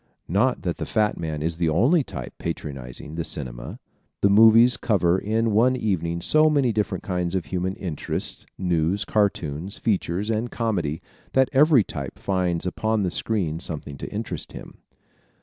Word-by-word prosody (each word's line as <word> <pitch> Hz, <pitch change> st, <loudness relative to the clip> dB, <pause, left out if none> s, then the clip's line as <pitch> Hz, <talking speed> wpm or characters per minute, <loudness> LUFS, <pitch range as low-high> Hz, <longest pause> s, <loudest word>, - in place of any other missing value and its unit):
Not 120 Hz, +9 st, +1 dB
that 85 Hz, -3 st, -2 dB
the -, -, -4 dB
fat 105 Hz, -2 st, +1 dB
man 80 Hz, -2 st, -3 dB
is 80 Hz, 0 st, -1 dB
the 85 Hz, -2 st, +1 dB
only 125 Hz, -, +3 dB
type 65 Hz, -, -7 dB
patronizing 70 Hz, 0 st, -6 dB
the 85 Hz, +1 st, -3 dB
cinema. -, -, -2 dB, 0.4 s
The 100 Hz, -, +4 dB
movies 115 Hz, +3 st, +7 dB
cover 95 Hz, -5 st, +2 dB
in 110 Hz, +3 st, 0 dB
one 120 Hz, +5 st, +4 dB
evening 85 Hz, -8 st, -1 dB
so 155 Hz, +6 st, +5 dB
many 140 Hz, -5 st, +2 dB
different 105 Hz, -1 st, -2 dB
kinds 90 Hz, -1 st, -2 dB
of 95 Hz, -, -1 dB
human 95 Hz, +1 st, -2 dB
interests 90 Hz, -8 st, -4 dB
news, 90 Hz, +1 st, 0 dB
cartoons, 95 Hz, -3 st, -1 dB
features 100 Hz, 0 st, -1 dB
and 115 Hz, +2 st, -1 dB
comedy 90 Hz, -12 st, -2 dB, 0.3 s
that 130 Hz, -1 st, +4 dB
every 140 Hz, -3 st, +6 dB
type 70 Hz, -7 st, -6 dB
finds 90 Hz, -3 st, -1 dB
upon 110 Hz, +3 st, 0 dB
the 90 Hz, -, -1 dB
screen 90 Hz, -8 st, -1 dB
something 75 Hz, -4 st, -4 dB
to -, -, -6 dB
interest -, -, -5 dB
him. -, -, -11 dB
95 Hz, 160 wpm, -24 LUFS, 80-110 Hz, 0.4 s, movies